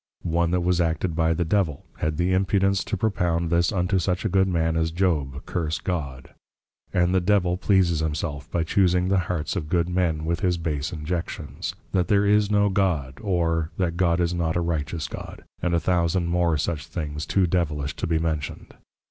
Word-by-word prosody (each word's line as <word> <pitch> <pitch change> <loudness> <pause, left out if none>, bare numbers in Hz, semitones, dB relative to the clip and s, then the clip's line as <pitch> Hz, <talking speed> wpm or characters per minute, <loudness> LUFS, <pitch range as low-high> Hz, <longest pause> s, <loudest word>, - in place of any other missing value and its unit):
One 85 0 +1
that 90 +1 +1
was 90 0 +2
acted 80 0 -1
by 80 0 +2
the 85 - 0
Devil, 80 -5 0
had 75 -1 -1
the 90 +2 +1
impudence 95 +1 +2
to 105 - -2
propound 85 -5 0
this 85 0 +3
unto 95 0 +1
such 90 0 -1
a - - +2
good 95 -1 +3
man 80 -3 +1
as 80 0 +1
Job, 80 -6 -1
Curse 80 -3 -2
God. 70 -8 -4 0.6
And 90 0 +2
the 95 - +3
Devil 90 -2 +2
pleases 90 -4 +2
himself, 75 -2 -3
by 85 - 0
chusing 90 +1 +2
the 95 -1 +3
Hearts 85 -1 -2
of 80 -5 -3
good 85 -1 +2
men, 85 -4 0
with 85 +1 0
his 90 -3 +1
base 80 -3 -2
Injections, 85 +2 -4 0.2
That 90 -3 +1
there 100 +1 +3
is 105 0 +3
no 105 -1 +3
God, 80 -10 0
or, 85 -5 0
That 85 -3 0
God 85 -1 +2
is 85 0 +1
not 85 -2 -1
a 85 - +1
Righteous 80 -2 -2
God; - - -8 0.2
and 85 -1 +1
a - - +3
thousand 85 +1 +1
more 85 -2 +1
such 75 +1 -2
things, 75 -3 -4
too 95 -2 +2
Devilish 80 -5 -1
to - - -2
be 80 -1 +1
mentioned. 80 -2 -3
85 Hz, 195 wpm, -24 LUFS, 80-90 Hz, 0.6 s, this